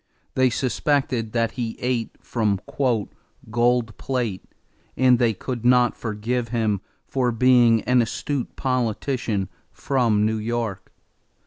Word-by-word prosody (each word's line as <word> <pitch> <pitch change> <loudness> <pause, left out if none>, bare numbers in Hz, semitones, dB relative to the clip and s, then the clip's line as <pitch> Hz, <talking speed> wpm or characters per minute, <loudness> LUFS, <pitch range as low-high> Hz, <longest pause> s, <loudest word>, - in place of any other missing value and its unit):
They 130 0 +3
suspected 125 -1 0
that 115 -1 +1
he 115 -2 -4
ate 125 -2 -2
from 105 -5 0 0.9
"gold 120 -1 +1
plate" 120 -8 -2 0.5
and 125 -2 +5
they 115 -3 +2
could 120 +2 -5
not 125 -1 +4
forgive 115 +2 -2
him 110 -4 0 0.2
for 125 -2 0
being 120 -1 +4
an 125 0 +3
astute 125 +3 -3
politician 120 -4 -1 0.2
from 115 -6 +1
New 110 0 0
York. 115 -2 -3
120 Hz, 115 wpm, -23 LUFS, 110-125 Hz, 0.9 s, and